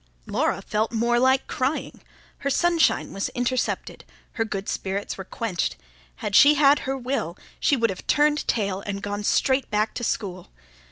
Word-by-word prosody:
Laura - - -1
felt 215 +1 -1
more 235 +1 +2
like 260 +1 +3
crying; 265 +4 -2 0.4
her 280 - -1
sunshine 340 +3 +2
was 195 - -2
intercepted, 245 0 -2 0.3
her 225 - -1
good 200 -3 -5
spirits 195 +1 -3
were 190 - -7
quenched; 205 -3 -2 0.4
had 195 - -3
she 290 +5 +8
had 285 0 +5
her 270 - -1
will, 245 - -3 0.2
she 285 - +3
would 230 -3 +2
have 185 - -9
turned 295 0 +2
tail 200 -3 0
and 200 0 -4
gone 205 0 -3
straight 260 +5 +2
back 215 0 0
to 240 - -5
school. 185 -6 -3
230 Hz, 165 wpm, -24 LUFS, 200-270 Hz, 0.4 s, she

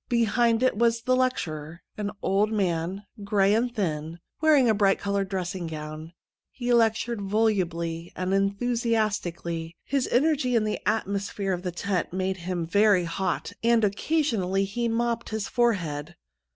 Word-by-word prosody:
Behind 235 0 +2
it 255 - +3
was 230 0 +2
the 255 +1 +2
lecturer, 170 - -2
an 210 -1 -3
old 205 +3 +2
man, 185 -1 -1 0.2
gray 200 0 +3
and 240 +3 +1
thin, 165 -7 -3 0.2
wearing 300 -5 +5
a 220 - +4
bright 200 -2 +3
coloured 200 -1 -1
dressing 185 -2 -3
gown. 155 +1 -7 0.4
He 245 -1 -1
lectured 230 -1 +2
volubly 175 -5 0
and 185 +1 -1
enthusiastically; 200 -6 -1
his 275 -2 0
energy 265 -2 +2
and 220 -2 +3
the 215 - -2
atmosphere 200 -2 -1
of 180 - -3
the 180 -1 -3
tent 180 +1 -2
made 190 0 -1
him 175 -1 -3
very 200 +1 +4
hot, 185 +3 -2
and 230 -1 +4
occasionally 200 - +1
he 235 +5 -2
mopped 235 0 -1
his 215 -2 -3
forehead. 175 -10 0
200 Hz, 145 wpm, -26 LUFS, 180-230 Hz, 0.4 s, wearing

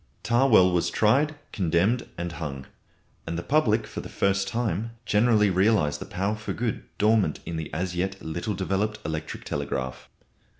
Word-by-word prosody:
Tawell 120 -7 +5
was 90 -1 +1
tried, 140 +8 +3 0.2
condemned, 95 +6 +1
and 85 0 -3
hung, 70 -5 -6 0.6
and 85 0 -2
the 85 - -3
public 115 - +2
for - - -6
the - - -9
first 100 0 +1
time 115 -1 -2
generally 105 -1 +4
realised 95 -5 +2
the - - -4
power 100 +3 -1
for 105 -1 -5
good 115 -2 -2
dormant 105 -7 +3
in 85 - -4
the 80 -2 -4
as 90 +2 -2
yet 95 +2 -2
little 85 +6 -3
developed 95 +3 -1
electric 80 0 -4
telegraph. 65 0 -4
95 Hz, 160 wpm, -26 LUFS, 85-110 Hz, 0.6 s, Tawell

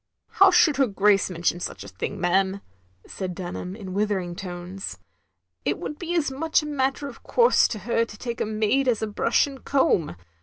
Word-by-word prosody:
" - - -58
How 390 0 +9
should 335 -5 +4
her 270 -2 +4
Grace 200 -1 +3
mention 175 0 -1
such 175 - -5
a - - -10
thing, 95 -1 -5
ma'am, 190 +2 +1 0.2
" 90 0 -38
said 185 -2 -5
Dtmham, 180 +1 -6
in 190 -4 -7
withering 195 -4 -1
tones. 180 +1 -6 0.3
" - - -53
It - - 0
would 300 - -6
be 345 0 -3
as 305 -5 +1
much 310 +3 +1
a - - -5
matter 280 -1 -1
of 275 - -11
course 475 0 +4
to 220 - -4
her 230 +3 0
to 215 - -12
take 235 +1 -5
a - - +1
maid 220 +5 +1
as 230 -3 +1
a - - 0
brush 210 - +2
and 275 -2 -10
comb. 265 - +1
210 Hz, 215 wpm, -25 LUFS, 185-275 Hz, 0.3 s, How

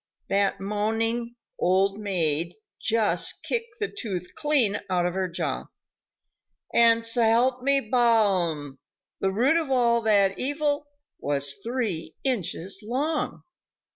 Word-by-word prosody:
That 200 0 +1
moaning 225 +4 -1 0.2
"Old 195 +3 +2
maid" 170 -4 0 0.2
just 225 -1 +1
kicked 460 -2 -3
the 430 - 0
tooth 190 - -5
clean 260 -10 +1
out 180 -1 +1
of 175 - -1
her 190 0 -1
jaw. 170 - -3 1.1
And, 230 -1 +5
s'help 235 +2 +3
me 275 +1 +3
Balaam! 190 - +2 0.4
the 195 - +1
root 245 +11 +3
of 320 -4 -1
all 235 -3 +3
that 200 -3 +2
evil 290 +1 -1 0.3
was 140 0 -1
three 225 -9 -3
inches 195 -6 -2
long. 275 +8 -2
220 Hz, 115 wpm, -26 LUFS, 190-250 Hz, 1.1 s, And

